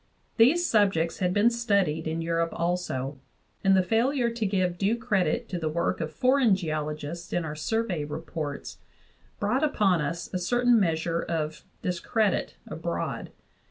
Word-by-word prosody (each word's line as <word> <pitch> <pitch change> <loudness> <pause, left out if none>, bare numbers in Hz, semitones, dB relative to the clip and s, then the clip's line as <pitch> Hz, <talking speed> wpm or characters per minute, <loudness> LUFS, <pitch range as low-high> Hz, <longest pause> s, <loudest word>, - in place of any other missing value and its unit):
These 290 +10 +5
subjects 195 - +2
had 180 -2 +1
been 205 +5 +4
studied 200 -9 +1
in 165 +1 -2
Eu 165 0 -2
rope 165 0 -1
also, 160 -6 -2 0.4
and 195 -1 +5
the 185 - +4
failure 235 +5 +1
to 230 -2 -2
give 185 -3 0
due 205 +4 +2
credit 225 +2 0
to 180 - -3
the 160 -2 -1
work 170 +1 -1
of 160 -1 -3
foreign 255 - +3
geologists 155 -1 -4
in 175 -2 0
our 150 -1 -4
Survey 190 0 -1
reports 150 -1 -5 0.6
brought 245 +8 +1
upon 200 - +2
us 170 +3 -3
a 185 - 0
certain 245 +5 +3
measure 165 -2 0
of 155 -2 -3 0.2
discredit 185 - 0
abroad. - - -4
180 Hz, 155 wpm, -27 LUFS, 160-225 Hz, 0.6 s, These